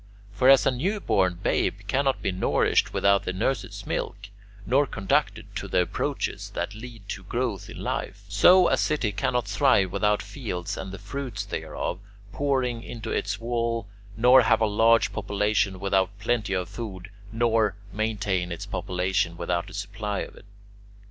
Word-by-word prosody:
For 125 +6 +4
as 135 -1 +7
a - - +4
newborn 125 - +1
babe 100 - 0
cannot 135 +5 0
be - - +1
nourished 90 +1 +2
without 100 0 +3
the 90 - -2
nurse's 120 +7 -2
milk, 100 -1 -4 0.4
nor 140 +3 +3
conducted 95 -4 -1
to - - -5
the 90 - +2
approaches - - -3
that 85 +4 -2
lead 110 -2 -10
to 95 - -5
growth 115 -1 -3
in - - -9
life, - - -4
so 185 -1 +6
a - - +2
city 145 -9 0
cannot 115 +3 -1
thrive 105 -4 +3
without 105 -1 +1
fields 100 -5 -5
and 95 - -6
the 100 - -7
fruits 125 +7 -5
thereof 90 - -4 0.3
pouring 130 -4 0
into 115 -1 -7
its - - -1
walls, 115 -1 -1 0.3
nor 125 +3 +7
have 115 -1 +3
a - - +5
large 110 +2 +3
population 105 -1 0
without 95 0 +1
plenty 110 -4 -1
of 90 -1 -2
food, 95 -5 -7 0.2
nor 115 -3 +2 0.2
maintain 100 -4 -1
its 85 - -5
population 90 -2 -1
without 85 +2 -2
a - - -12
supply 100 0 -3
of - - -7
it. - - -16
105 Hz, 160 wpm, -26 LUFS, 95-120 Hz, 0.4 s, as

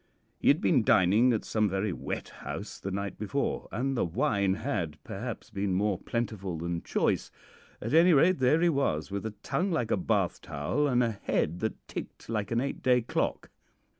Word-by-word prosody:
He - - -2
had 145 +6 +5
been 130 -9 +3
dining 105 +7 +5
at 110 - -1
some 110 -2 +1
very 95 +1 -1
wet - - -5
house - - -7
the 100 - -4
night 100 0 -4
before, 140 +7 -2
and 135 +3 -1
the - - +1
wine 95 +3 +1
had, 100 - -2
perhaps, - - -6
been 100 -1 -1
more 100 -1 +1
plentiful 105 -7 -3
than 85 +1 -3
choice; - - 0 0.5
at 115 - -4
any 170 +3 +7
rate, 165 +3 +5
there 130 +5 +4
he 175 - +4
was, 135 - 0
with 100 +2 -3
a 105 - -7
tongue 190 +2 0
like 140 - -1
a - - +3
bath - - 0
towel 75 - -1
and 125 -2 +3
a 115 - +1
head 85 +3 0
that 110 +1 -4
ticked - - -8
like 105 -3 -1
an 115 - +1
eight 140 +3 -3
day 125 -1 +4
clock. - - -2
110 Hz, 195 wpm, -29 LUFS, 95-135 Hz, 0.5 s, any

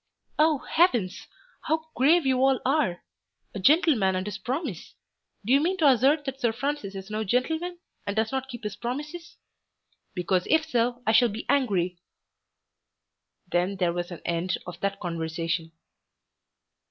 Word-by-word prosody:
"Oh 310 -1 +4
heavens, 240 - +2 0.4
how 315 0 0
grave 305 +6 +4
you 260 -1 +2
all 270 -1 +4
are! 265 - +1 0.5
A 205 - -5
gentleman 260 - +4
and 185 0 -2
his 205 -2 -5
promise! 255 - -4 0.5
Do 240 - +2
you 280 - +5
mean 365 +4 0
to 315 -5 +4
assert 275 +4 +4
that 270 0 -5
Sir 235 -3 +2
Francis 245 -4 -3
is 195 +2 -8
no 215 +1 -1
gentleman, 320 - -1 0.3
and 200 - -2
does 220 0 0
not 265 0 -3
keep 240 -3 -8
his 210 -1 -4
promises? 295 +8 -6 0.8
Because 180 0 0
if 315 0 +3
so 245 -4 0
I 220 - +3
shall 235 +2 +5
be 220 +2 -6
angry." 190 -11 +1 1.5
Then 180 +3 +1
there 180 -3 +1
was 175 0 -3
an 175 - -8
end 170 +2 -1
of 175 -1 -8
that 200 +1 -2
conversation. 165 -1 -3
235 Hz, 155 wpm, -26 LUFS, 185-285 Hz, 1.5 s, you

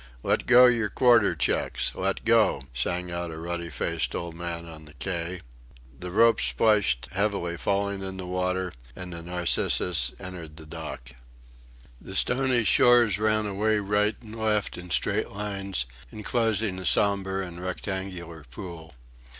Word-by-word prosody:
"Let - - 0
go 125 0 +8
your 115 -4 +3
quarter 120 -4 +4
checks! - - 0
Let 95 +4 -2
go!" 115 - +3
sang 90 +8 -2
out 85 0 -3
a 80 - -7
ruddy 85 +1 -4
faced 75 - -2
old 85 -1 -4
man 85 0 -5
on 80 -2 -11
the 75 0 -15
quay. 85 +3 -4 0.6
The 90 0 -6
ropes 115 +4 +4
splashed 105 - +2
heavily 95 -3 -1
falling 100 +2 -1
in 95 0 -5
the 95 - -6
water, 90 0 -2 0.2
and 90 -1 -7
the 85 - -7
Narcissus 85 -4 +2
entered 85 -4 -8
the 80 - -9
dock. 75 -6 -8 0.9
The - - -9
stony 125 -2 +2
shores 120 -3 +5
ran 110 0 +2
away 105 +2 +1
right 105 +1 +1
and 110 -2 -10
left 110 -2 0
in 90 0 -9
straight 80 - 0
lines, 100 -7 -3 0.3
enclosing 110 -3 0
a 95 - -7
sombre 95 -1 +2
and 90 0 -9
rectangular 95 -3 -5
pool. 80 +2 -9
95 Hz, 150 wpm, -26 LUFS, 85-105 Hz, 0.9 s, go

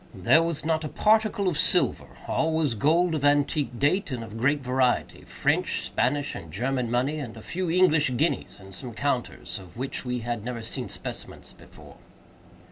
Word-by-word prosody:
There 120 - +4
was 165 -2 -1
not 160 -1 +1
a - - -2
particle 215 0 +2
of 165 -4 0
silver. 180 - +3 0.2
All 160 0 +1
was 155 -5 +1
gold 165 +9 +2
of 150 -3 -2
antique 145 -2 +2
date 150 +10 +1
and 125 -4 -4
of 110 -1 -9
great 135 +6 +2
variety—French, 130 -1 0
Spanish, 145 -1 0
and 85 - -8
German 125 - -1
money, 135 +6 0
with 120 -4 -7
a 110 - -10
few 180 0 -3
English 160 -7 +3
guineas, 155 -5 -1
and 95 0 -12
some 120 +4 -5
counters, 120 -2 -2
of 90 -1 -14
which 130 +2 -3
we 125 -1 -3
had 120 -2 -3
never 120 -1 -5
seen 115 - -4
specimens - - -6
before. - - -16
140 Hz, 175 wpm, -26 LUFS, 120-160 Hz, 0.2 s, There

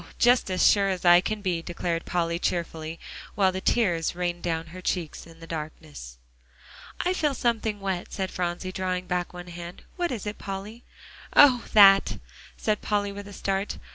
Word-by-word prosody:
just 245 -3 +4
as 185 -1 +2
sure 200 -1 +4
as 185 -1 -3
I 175 0 +8
can 215 +1 -4
be," 175 -3 0
declared 170 0 -3
Polly 170 -1 -1
cheerfully, 165 -2 -3 0.4
while 190 -2 +3
the 190 0 -5
tears 175 -10 +1
rained 175 -1 -2
down 165 -1 -2
her 185 - -8
cheek 175 -4 -2
in 165 -1 -16
the 165 - -10
darkness. 155 - -8 0.8
"I 360 - +1
feel 300 -6 0
something 220 -4 -1
wet," 190 -3 -3
said 190 -2 -3
Phronsie, 180 +1 -3
drawing 185 -1 -2
back 180 -1 -2
one 180 0 -9
hand. 175 +1 -9
"What 350 -1 -1
is 225 -5 -4
it, 210 0 -5
Polly?" 200 +4 -7 0.5
"Oh! 255 -5 +7
that," 195 -2 +7 0.4
said 215 -1 -1
Polly 205 -1 -1
with 200 0 -8
a - - -10
start. 195 +1 -2
185 Hz, 175 wpm, -26 LUFS, 175-205 Hz, 0.8 s, I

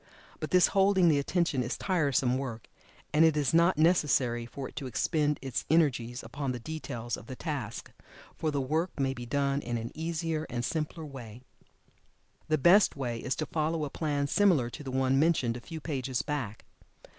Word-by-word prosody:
But - - -4
this 180 -1 +5
holding 195 -3 +4
the 145 -3 +3
attention 155 -2 0
is 125 0 -3
tiresome 140 -8 +1
work, 120 -5 -6 0.5
and 155 +2 +5
it 160 -2 +4
is 145 +1 +1
not 170 +1 +4
necessary 140 -8 +2
for 135 +2 -6
it - - -14
to 135 - -4
expend 150 +4 0
its 135 -3 -2
energies 125 -7 +2
upon 130 +3 -3
the 125 - -5
details 120 -5 -5
of 110 - -12
the 130 - -6
task, 130 -7 -5 0.4
for 160 - -1
the 145 -2 -1
work 155 +6 -1
may 135 -1 +1
be 120 -2 -8
done 140 +1 0
in 120 -2 -3
an 115 +2 -5
easier 160 -1 -2
and 120 0 -2
simpler 160 0 -3
way. 125 -4 -10 1.0
The 155 0 +2
best 180 +8 +5
way 120 -4 -3
is 130 - -2
to 155 - -2
follow 155 0 -1
a 140 - -7
plan 145 -3 -1
similar 145 -7 +3
to 150 - -8
the 135 - -6
one 130 +1 +2
mentioned 145 -7 +2
a 120 - -7
few 160 +6 -7
pages 135 -5 -2
back. 125 -8 -4
140 Hz, 190 wpm, -29 LUFS, 125-160 Hz, 1.0 s, this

